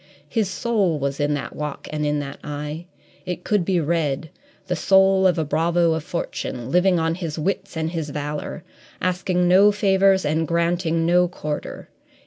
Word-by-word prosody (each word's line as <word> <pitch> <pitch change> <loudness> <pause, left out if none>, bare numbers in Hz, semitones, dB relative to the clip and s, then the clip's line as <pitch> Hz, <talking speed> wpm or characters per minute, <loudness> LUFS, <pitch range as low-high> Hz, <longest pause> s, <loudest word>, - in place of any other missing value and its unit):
His 220 -5 0
soul 200 -6 0
was 140 -1 -2
in 145 0 +1
that 125 -4 -6
walk 150 -1 -5
and 150 0 -2
in 150 0 +1
that 140 -1 -7
eye; 150 +3 -5 0.4
it 180 -1 -5
could 210 -4 +1
be 180 0 +1
read 155 -2 -1 0.3
the 180 -1 -1
soul 190 +2 +4
of 180 - +2
a 160 - 0
bravo 165 +3 +2
of 160 -1 -3
fortune, 130 -7 -4
living 180 +1 +4
on 165 0 +1
his 165 -3 -5
wits 190 +2 -2
and 160 0 -1
his 160 -3 -3
valour, 150 +1 -5 0.4
asking 180 0 0
no 195 +3 +6
favours 195 -1 +3
and 160 +2 0
granting 170 -1 +1
no 180 +1 +4
quarter. 150 -3 -5
170 Hz, 170 wpm, -22 LUFS, 150-185 Hz, 0.4 s, no